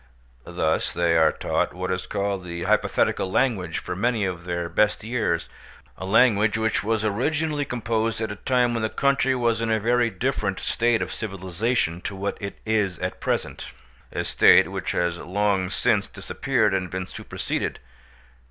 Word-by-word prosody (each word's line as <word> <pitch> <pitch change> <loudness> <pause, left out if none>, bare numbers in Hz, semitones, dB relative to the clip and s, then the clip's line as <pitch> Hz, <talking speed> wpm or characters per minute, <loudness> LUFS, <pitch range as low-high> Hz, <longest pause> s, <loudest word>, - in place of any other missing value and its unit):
Thus 85 -2 0
they 85 -1 +1
are 80 -1 +5
taught - - -1
what 90 0 -3
is 90 0 -3
called 100 -1 -2
the 85 -1 -5
hypothetical 95 - +1
language 95 -7 0
for - - -4
many 110 +1 +1
of 90 -2 -4
their 85 -1 -2
best 105 +6 +1
years—a 110 -5 -4
language 105 -1 +4
which 110 0 0
was 110 0 0
originally 145 +7 0
composed 115 -2 -1
at 110 -2 -2
a - - -5
time 125 +2 +1
when 115 - -1
the 110 - 0
country 135 0 +2
was 115 -2 +1
in 115 - -1
a 110 - +2
very 120 +2 +2
different 105 -2 -2
state 120 -1 +1
of - - -6
civilisation 95 -2 -2
to 100 - -5
what 100 +1 -3
it 100 -1 -5
is 105 -5 +1
at - - -4
present, - - -2 0.4
a - - -2
state - - +5
which - - -3
has 85 -1 0
long 95 0 0
since 105 0 +1
disappeared 110 +2 0
and 95 -2 -1
been 95 +1 -3
superseded. - - -4
105 Hz, 165 wpm, -24 LUFS, 90-115 Hz, 0.4 s, are